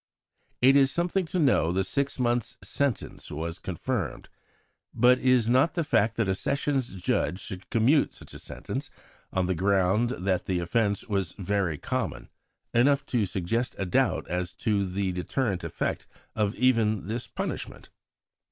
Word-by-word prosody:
It 135 +2 +7
is 135 -1 +6
something 175 +4 0
to 185 - -2
know 130 - +3
the 95 +2 +1
six 140 +8 -1
months' 120 -3 0
sentence 130 +5 -2
was 80 +3 -4
confirmed. 90 -4 -3 0.7
But 125 +1 +5
is 130 -3 +3
not 130 +7 +3
the 170 - +1
fact 115 -6 +2
that 115 -3 +1
a 95 - +2
Sessions 135 +1 -1
Judge 90 0 0
should 95 -1 -7
commute 125 +6 +3
such - - -13
a - - -9
sentence, - - -6 0.4
on 95 -1 +1
the 95 - +1
ground 95 +5 +2
that 95 0 -1
the 95 - 0
offence 100 +4 0
was 100 -5 -1
"very 95 -5 -1
common," - - -3 0.4
enough 140 +4 +3
to 110 -5 +2
suggest 100 +7 -2
a 95 - -2
doubt 90 - +1
as 90 0 -2
to 100 -4 0
the 95 +1 -1
deterrent 95 +2 -2
effect - - -3 0.3
of 105 -2 0
even 115 -5 +2
this 115 +4 -4
punishment? - - -5
105 Hz, 155 wpm, -27 LUFS, 95-125 Hz, 0.7 s, It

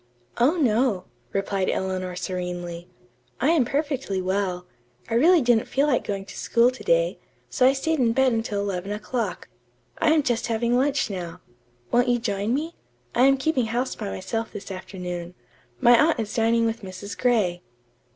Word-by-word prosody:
"Oh, 280 +9 +4
no," 230 - +2 0.3
replied 195 -1 -1
Eleanor 185 -1 -2
serenely. 175 -1 -5 0.5
"I 275 +6 +3
am 310 -7 +3
perfectly 275 -7 -1
well. 185 -1 -1 0.5
I - - 0
really 320 +6 +5
didn't 240 -2 +3
feel 275 +2 +1
like 280 -5 +1
going 195 -1 -4
to - - -11
school 235 +2 +3
to 255 - -11
day, - - +2 0.3
so 255 -2 +4
I 265 - +5
stayed 320 +3 -1
in 235 -3 +3
bed 265 +2 +3
until 225 -3 -1
eleven 195 -1 -3
o'clock. 225 +3 -3 0.5
I - - +3
am 315 -2 +3
just 240 -3 0
having 235 +1 +1
lunch 270 -2 +1
now. 175 -3 -6 0.5
Won't 245 +1 +3
you 245 0 +3
join 205 -2 -2
me? 310 +6 -1 0.4
I 250 - +4
am 275 0 +4
keeping 265 -4 0
house 245 +4 -1
by 210 -3 -5
myself 225 +5 -4
this 200 -1 -8
afternoon. 180 -2 -6 0.4
My 240 +3 +6
aunt 320 - 0
is 215 -2 -3
dining 230 0 +2
with 225 +1 -2
Mrs. 195 +1 -7
Gray." 210 -8 +1
230 Hz, 170 wpm, -24 LUFS, 190-260 Hz, 0.5 s, My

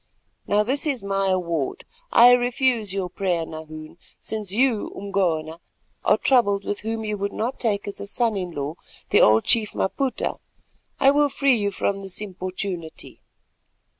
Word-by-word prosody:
Now 205 +1 +3
this 275 +7 0
is 270 -7 -1
my 195 0 0
award: 170 -6 -1 0.3
I 240 +1 +8
refuse 245 -3 +2
your 190 -1 -2
prayer, 175 -2 -1
Nahoon, 155 -1 -8
and 170 - -20 0.2
since 215 -3 -4
you, 235 0 +1
Umgona, 170 -5 -1 0.4
are - - +4
troubled 205 -7 +2
with 205 - -3
one 220 - -2
whom 225 -1 -3
you 210 -1 -3
would 200 +1 -2
not 240 +4 -3
take 210 -4 0
as 200 0 -6
son 230 -1 0
in 185 -2 -3
law, 145 -2 -4 0.4
the - - +5
old 110 +1 +5
chief 220 -3 +2
Maputa, 255 +5 -1 0.6
I 275 0 +6
will 290 0 +3
free 275 -1 +2
you 205 -3 0
from 195 0 -2
his 195 -2 -3
importunity. 185 -4 -6
200 Hz, 165 wpm, -23 LUFS, 180-235 Hz, 0.6 s, I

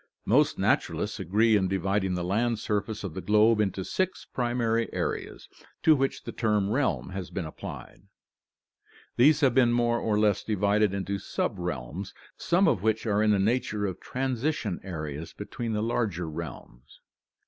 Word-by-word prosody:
Most - - +3
naturalists 105 +1 0
agree 105 +5 +3
in 95 -2 +2
dividing 95 0 0
the 90 - -2
land 110 +6 +1
surface 105 +1 -2
of 95 -5 -5
the 95 - -5
globe 105 +4 +4
into 95 -2 -1
six 185 0 -2
primary 120 -2 -1
areas, - - -4 0.4
to 155 - +6
which 135 -1 -1
the - - -6
term 105 -3 0
realm 130 -6 0
has 95 -2 -5
been 95 - -4
applied. 80 - -9 1.2
These 145 +5 +5
have 135 -4 +4
been 120 -2 +4
more 120 0 +2
or 105 -2 0
less 105 -2 +2
divided 105 0 +2
into 100 +1 -2
subrealms, 90 -1 -4 0.2
some 180 +2 +2
of 120 - +2
which 110 +2 0
are 105 -1 +2
in 110 - +3
the 105 - +4
nature 105 0 0
of 95 -3 -4
transition 130 - -2
areas 80 -3 -6
between 110 +3 -5
the 105 0 -1
larger 105 -7 -1
realms. 75 -6 -9
105 Hz, 160 wpm, -27 LUFS, 95-120 Hz, 1.2 s, to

